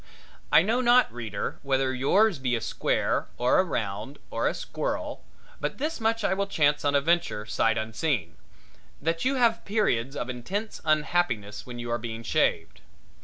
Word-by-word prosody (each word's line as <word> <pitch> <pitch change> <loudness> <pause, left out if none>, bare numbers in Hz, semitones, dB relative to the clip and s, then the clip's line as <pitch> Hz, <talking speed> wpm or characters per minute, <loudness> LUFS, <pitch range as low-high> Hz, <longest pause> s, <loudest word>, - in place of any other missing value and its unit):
I 160 - +7
know 230 +6 +1
not, 245 - +4
reader, 110 -4 -4
whether 135 -1 +1
yours 175 - +3
be 125 -2 0
a 115 - -2
square - - 0
or 125 +7 +3
a - - +5
round 110 - -4
or - - 0
a - - 0
squirrel, - - -4 0.4
but - - -3
this 305 +3 -2
much 225 0 0
I - - +2
will 200 +1 -1
chance 145 -1 +2
on 145 -1 +2
a 140 - +4
venture, 160 -9 0
sight 115 +1 +1
unseen 110 - -1 0.6
that 165 - -1
you 270 +1 +2
have 235 -3 +3
your - - -26
periods 140 - 0
of 120 - -3
intense 185 - -4
unhappiness 150 -10 0
when 120 -1 -7
you 120 0 -5
are 120 - 0
being 115 0 -6
shaved. 100 - 0
140 Hz, 175 wpm, -27 LUFS, 115-195 Hz, 0.6 s, I